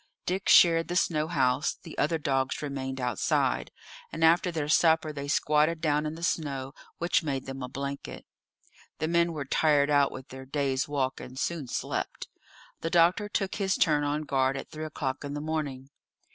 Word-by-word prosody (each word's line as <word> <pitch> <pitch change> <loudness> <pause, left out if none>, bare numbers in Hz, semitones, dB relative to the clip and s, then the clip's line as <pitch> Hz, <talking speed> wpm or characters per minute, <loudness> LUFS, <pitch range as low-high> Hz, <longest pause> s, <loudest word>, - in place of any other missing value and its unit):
Dick 190 +2 -1
shared 165 -1 +6
the 175 - -3
snow 155 -3 +1
house; 135 -3 +1
the 165 - -9
other 160 +2 +2
dogs 135 -2 -1
remained 135 -2 -4
outside, 125 -4 0 0.4
and 160 - -3
after 170 +3 +4
their 155 -3 -2
supper 160 0 +3
they 140 -1 -5
squatted 150 +2 +2
down 150 -1 +1
in 155 - -5
the 165 - -9
snow, 140 -5 -2 0.2
which 170 +2 +1
made 140 -5 -3
them 135 0 -6
a 125 - -5
blanket. 140 +2 -6 0.7
The 155 - -1
men 170 +1 +2
were 150 -4 -4
tired 145 +1 +3
out 145 -1 +4
with 130 0 -9
their 130 0 -10
day's 135 -1 -1
walk, 135 -3 -1
and 130 +1 -10
soon 155 -1 -2
slept. - - -4 0.5
The 165 - -3
doctor 175 +5 +3
took 195 -2 -1
his 195 -2 0
turn 150 -3 +3
on 145 +1 -1
guard 135 -2 +1
at 135 - -8
three 155 0 -5
o'clock 145 -3 -4
in 145 0 -5
the - - -3
morning. 145 -3 -4
150 Hz, 185 wpm, -28 LUFS, 135-165 Hz, 0.7 s, shared